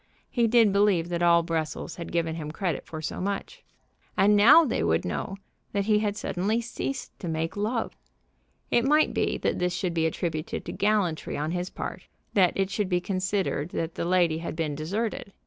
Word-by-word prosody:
He 235 -2 +2
did 225 -3 +5
believe 200 -4 +3
that 170 -1 -2
all 170 -1 +5
Brussels 165 0 -3
had 170 - -6
given 165 -1 0
him 155 -2 -5
credit 165 -1 -3
for 160 -1 -7
so 150 - -4
much. 200 - -4 0.5
And 210 +1 +5
now 270 +11 +8
they 245 - -1
would 80 0 +1
know 190 - -3 0.4
that 200 -1 0
he 210 0 +3
had 210 -1 -1
suddenly 205 +6 -1
ceased 235 +3 -4
to 180 - -5
make 160 0 -2
love. 220 +3 -2 0.8
It 235 - +4
might 300 +4 +3
be - - 0
that - - -1
this 180 0 0
should 180 -2 -2
be 160 -1 +2
attributed 160 -1 -3
to - - -4
gallantry 200 -6 0
on 150 +2 -2
his 180 +1 -2
part, - - -6 0.3
that 185 -4 +4
it 195 0 0
should 205 -2 -1
be 180 -1 +2
considered 185 -4 -1
that 165 0 -2
the - - -3
lady 175 -3 +2
had 170 - -5
been 160 -2 -1
deserted. 200 +7 -3
180 Hz, 195 wpm, -27 LUFS, 165-210 Hz, 0.8 s, now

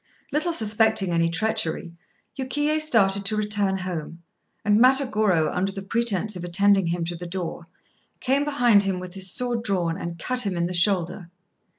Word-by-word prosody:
Little 310 +5 0
suspecting 220 - +1
any 165 0 +1
treachery, 180 -3 -1 0.4
Yukiyé 295 +3 -1
started 200 -9 +2
to 215 - 0
return 205 -2 0
home, 170 -2 -6 0.4
and 210 0 +3
Matagorô, 220 - +3
under 190 +2 -1
the 195 0 -8
pretence 215 -1 0
of 175 - -7
attending 195 +1 +3
him 170 0 -2
to 175 +1 -5
the 175 +1 -8
door, 170 -1 -6 0.5
came 270 +2 +1
behind 245 -8 +3
him 195 -2 0
with 180 -1 -9
his 190 -1 -1
sword 240 +2 -1
drawn 175 -6 -1
and 170 0 -6
cut 250 +8 0
him 195 -4 -2
in 170 - 0
the 180 - -4
shoulder. 175 -1 0
195 Hz, 170 wpm, -24 LUFS, 175-230 Hz, 0.5 s, and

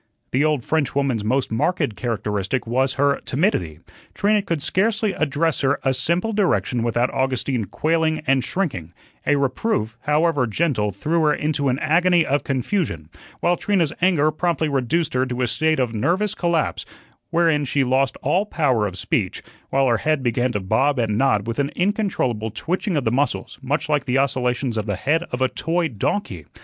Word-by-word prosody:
The 135 +3 +2
old 150 -5 +1
French 150 -2 -1
woman's 135 -6 0
most 125 +4 0
marked 140 - 0
characteristic 105 0 -2
was 130 +3 0
her 140 0 +2
timidity. 90 - -1 0.3
Trina 210 +1 +2
could 170 -5 -2
scarcely 215 +1 +1
address 155 +1 0
her 135 0 +1
a 135 - +2
simple 170 - 0
direction 185 - +1
without 120 +2 0
Augustine 130 -3 -1
quailing 160 - 0
and 135 -3 +2
shrinking; 95 - -3 0.3
a 145 - +4
reproof, 130 - -1
however 150 -3 +2
gentle, 110 -4 0
threw 155 - -1
her 150 - +4
into 145 -2 0
an 125 - +1
agony 170 +3 +3
of 145 +1 0
confusion; 130 - -2 0.3
while 175 - +3
Trina's 175 -5 0
anger 160 -5 +3
promptly 160 -1 0
reduced 140 +4 0
her 130 +1 +1
to 125 0 -2
a - - +1
state 155 +7 +1
of 125 -3 0
nervous 180 - 0
collapse, 170 -3 0 0.5
wherein 165 -3 +2
she 140 0 +1
lost 130 +1 +1
all 185 +9 +1
power 130 - +1
of 90 -2 -7
speech, - - -2 0.3
while 135 0 +2
her 120 -3 +3
head 150 +4 0
began 120 +1 +1
to 105 - 0
bob 110 +9 +1
and 110 -3 0
nod 105 -4 +2
with 115 +3 -3
an 140 0 +1
incontrollable 180 - 0
twitching 175 - -2
of 140 - 0
the 110 - +2
muscles, 140 +4 -1
much 145 +4 -1
like 150 -2 +1
the 130 0 +1
oscillations 130 -3 0
of 110 0 -2
the 100 - -1
head 150 - +1
of 125 - -3
a 130 - +4
toy 165 +5 -1
donkey. 105 - -3
140 Hz, 180 wpm, -22 LUFS, 120-165 Hz, 0.5 s, a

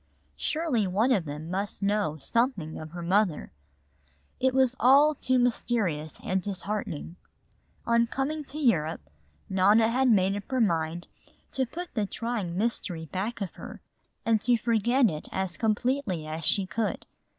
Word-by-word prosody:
Surely 300 - 0
one 215 +8 +2
of 195 -9 +2
them 150 +3 -6
must 200 +2 -3
know 200 -6 +1
something 190 - -1
of 155 - -8
her 170 +1 -7
mother. 185 -1 +1 0.9
It 260 0 +3
was 260 -1 +3
all 280 +5 +6
too 255 -2 +1
mysterious 220 - 0
and 190 0 0
disheartening. 190 -3 -4 0.7
On 235 0 +3
coming 290 +5 -2
to 285 - -8
Europe, 160 - +1 0.4
Nona 205 +4 +4
had 260 +2 +3
made 195 -3 +3
up 205 -1 -7
her 260 -1 0
mind 170 -5 0 0.5
to 260 -1 0
put 350 +7 -7
the 215 -4 -1
trying 215 -7 -3
mystery 190 -6 -2
back 200 +8 -4
of 195 - -3
her - - -10 0.5
and 225 -2 +3
to 240 +1 +3
forget 235 +3 +3
it 155 -5 -4
as 190 -2 -2
completely 220 - 0
as 155 +1 -5
she 190 +5 +3
could. 210 +4 -2
210 Hz, 150 wpm, -27 LUFS, 175-245 Hz, 0.9 s, all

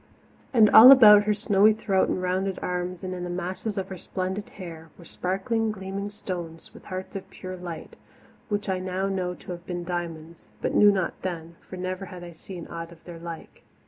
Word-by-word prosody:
And 225 -4 +6
all 240 +4 +11
about 210 -6 +9
her 210 - +3
snowy 205 0 +4
throat 195 -3 +1
and 185 - -2
rounded 185 +1 -1
arms, 180 0 -3
and 185 0 -4
in 180 -1 -5
the 180 - -4
masses 185 +4 -4
of 190 - -3
her 190 -2 -7
splendid 190 +4 -4
hair, 165 -4 -10
were 170 - -14
sparkling, 215 +6 -1
gleaming 195 0 -5
stones, 175 -5 -7
with - - -15
hearts 185 0 -6
of 195 - -6
pure 185 0 -8
light, 175 -3 -8 0.5
which 205 0 -2
I 190 -1 0
know 185 +1 -2
now 180 -2 -2
to - - -10
have 175 0 -8
been 175 -1 -4
diamonds, 170 -2 -6
but - - -2
knew 210 - +7
not 190 -3 -2
then, 170 -2 -5
for 185 - -10
never 185 +1 -4
had 180 -2 -10
I 175 - -9
seen 170 +1 -9
aught 165 0 -7
of 165 -1 -16
their 170 -2 -10
like. 170 -1 -9
185 Hz, 205 wpm, -26 LUFS, 175-195 Hz, 0.5 s, all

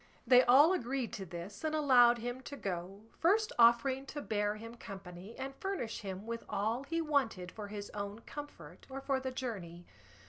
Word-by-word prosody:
They 250 +1 +8
all 275 +8 +7
agreed 260 -6 -2
to 195 -3 -5
this, 175 - -8
and 310 0 0
allowed 250 -5 +6
him 245 +2 -4
to 285 +2 -8
go, 190 0 -4 0.2
first 420 +6 +3
offering 255 +3 +5
to 295 - -5
bear 210 -1 0
him 230 +2 -9
company 195 -2 -9
and 270 +1 -5
furnish 385 - -3
him 195 0 -6
with 230 0 -4
all 220 +5 0
he 330 +4 -2
wanted 260 - 0
for 210 -2 -7
his 205 0 -7
own 205 +2 -5
comfort 290 +3 -10
or 270 0 -5
for 270 -1 0
the 260 0 -3
journey. 195 -10 -5
235 Hz, 180 wpm, -33 LUFS, 205-270 Hz, 0.2 s, They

